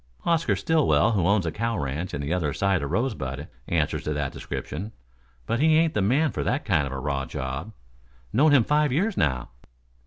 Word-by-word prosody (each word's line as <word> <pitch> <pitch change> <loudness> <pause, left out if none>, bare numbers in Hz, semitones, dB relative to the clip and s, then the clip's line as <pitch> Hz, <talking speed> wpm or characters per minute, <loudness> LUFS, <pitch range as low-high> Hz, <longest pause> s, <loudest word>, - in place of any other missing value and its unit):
Oscar 165 -1 +2
Stillwell 155 -7 +3
who 95 -6 +1
owns 100 -2 +3
a 80 - -1
cow 115 +5 -2
ranch 75 +6 -3
on 70 - -3
the 70 +4 -2
other 80 -6 0
side 100 -1 +1
of - - -4
the 70 - -2
Rosebud, 75 - -2 0.2
answers - - 0
to 75 - -1
that 75 -2 -2
description, 100 +9 -6 0.5
but 115 - -1
he 155 +2 +4
ain't 165 -1 +3
the 105 - +1
man 135 +9 +2
for - - -3
that 135 +4 -1
kind 80 -8 +2
of - - -7
a 65 - -4
raw 70 0 -2
job. 65 +10 -5 0.6
Known 145 +6 +5
him 140 -5 +6
five 150 +2 +2
years 190 - +1
now." 65 -5 0
100 Hz, 210 wpm, -25 LUFS, -, 0.6 s, him